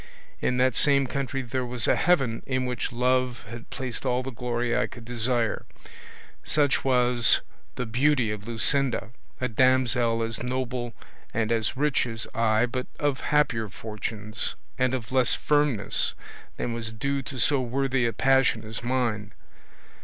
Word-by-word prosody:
In 125 - +1
that 130 0 +3
same 140 +2 +3
country 135 0 -3
there 130 +1 -2
was 125 -2 0
a - - +4
heaven 135 -10 +2
in 130 -1 0
which 125 +1 -2
love 125 0 0
had 115 0 -9
placed 130 -3 -4
all 125 -1 0
the 135 - -5
glory 120 0 -1
I - - +1
could 120 -2 -12
desire; 120 -1 0 0.8
such 145 -2 +1
was 125 -3 +5 0.3
the 125 - -3
beauty 125 0 +2
of 105 0 -6
Luscinda, 120 +1 +1 0.3
a 125 - 0
damsel 120 -1 +2
as 115 -1 -4
noble 125 -1 -3 0.4
and 110 0 0
as 115 +1 0
rich 145 -3 +1
as 115 -1 -4
I, 110 0 +3
but 125 +1 -4
of 145 -2 0
happier 120 -8 +1
fortunes, 110 +1 -4 0.2
and 130 0 +1
of 120 -2 -6
less 130 -2 +3
firmness 145 -8 +1 0.4
than 120 - -2
was 115 -1 -4
due 140 +5 -2
to 135 0 -7
so 140 0 +3
worthy 130 0 0
a - - 0
passion 130 +1 +3
as 110 0 -6
mine. 120 -4 -1
125 Hz, 155 wpm, -26 LUFS, 115-130 Hz, 0.8 s, was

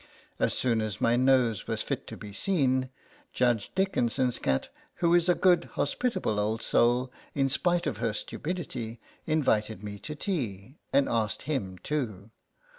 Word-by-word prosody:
As - - +2
soon 115 -3 +1
as 110 -3 -3
my 115 - +3
nose 125 -5 +3
was - - -1
fit - - -3
to - - -7
be 105 -1 -9
seen, 130 - +1 0.4
Judge 120 -4 +1
Dickin 190 -11 +2
son's 125 +1 +1
cat, 65 0 0 0.3
who 170 -1 +2
is 175 0 +4
a 175 - +5
good, 175 -2 +4
hospitable 145 - 0
old 110 +2 -1
soul, 125 +2 +3 0.2
in 135 -2 +3
spite 175 +5 +1
of 105 - -1
her 115 0 0
stupidity, 120 - -4 0.3
invited 110 -9 +1
me 100 -1 -6
to 150 - -6
tea, 130 - -3
and 140 0 +4
asked 110 -2 -1
him 125 -11 -2
too. 110 - -3
125 Hz, 160 wpm, -28 LUFS, 110-150 Hz, 0.4 s, a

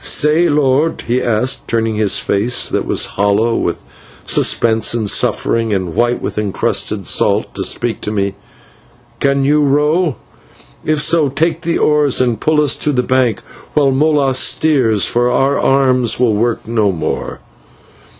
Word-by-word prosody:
"Say, 155 +4 +2
lord," 145 +2 +1
he 125 +2 -1
asked, 120 +2 -1
turning 115 -1 -1
his 105 -2 +1
face 115 +5 0
that - - -2
was - - 0 0.2
hollow 105 +3 +1
with 85 - -3 0.4
suspense 115 0 +1
and 110 -3 -2
suffering, 115 +2 0
and 95 -4 -3
white 120 +4 0
with - - -3
encrusted 105 0 -1
salt, - - +1
to - - -4
speak 120 -3 -4
to 105 - -3
me, 100 -2 -2 0.9
"can 140 0 +1
you 150 +2 +2
row? 150 +2 +1 0.7
If 155 -1 +1
so, 160 -3 +2
take 160 +4 -1
the 170 -1 -1
oars 150 -3 +2
and 120 -4 0
pull 155 -1 +2
us 145 - +1
to 150 - 0
the 125 -3 0
bank 125 -4 0 0.3
while 140 -2 +3
Molas 140 -2 +1
steers, 130 - +2
for 120 +1 +1
our 135 +2 +1
arms 130 -4 +1
will 120 -3 +2
work 115 +2 -2
no 110 -3 +1
more." 85 - -4
125 Hz, 155 wpm, -15 LUFS, 110-145 Hz, 0.9 s, while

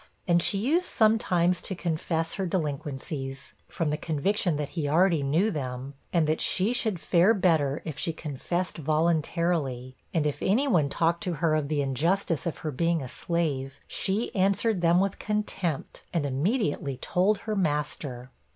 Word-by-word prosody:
And 175 -1 +4
she 195 - +2
used 310 - +1
sometimes 180 -6 +2
to 190 - -4
confess 165 -1 -2
her 190 -2 -2
delinquencies, 140 -4 -4
from 160 -3 -2
the 150 - 0
conviction 165 +2 0
that 145 -1 -3
he 155 -4 -2
already 170 0 +4
knew 160 +10 +2
them, 130 -3 -4 0.2
and 170 -3 +3
that 155 +1 0
she 200 +6 +1
should 220 -7 0
fare 185 +7 +4
better 160 -7 +2
if 150 -2 -5
she 165 - -1
confessed 165 +4 -3
voluntarily: 155 -4 0 0.2
and 160 -3 +1
if 150 - -2
any 240 +9 +2
one 165 - +3
talked 170 +3 +1
to 180 - -1
her 165 0 +1
of 155 -2 +1
the 145 -1 0
injustice 165 +5 0
of 165 - -3
her 155 - 0
being 165 +2 0
a - - -5
slave, 140 -3 -2
she 205 +5 -2
answered 195 +1 +2
them 170 +1 +4
with 195 0 0
contempt, 210 -7 -2
and 165 -4 0
immediately 145 - 0
told 190 +9 +1
her 215 -1 -3
master. 145 -7 -2
165 Hz, 165 wpm, -27 LUFS, 145-185 Hz, 0.2 s, And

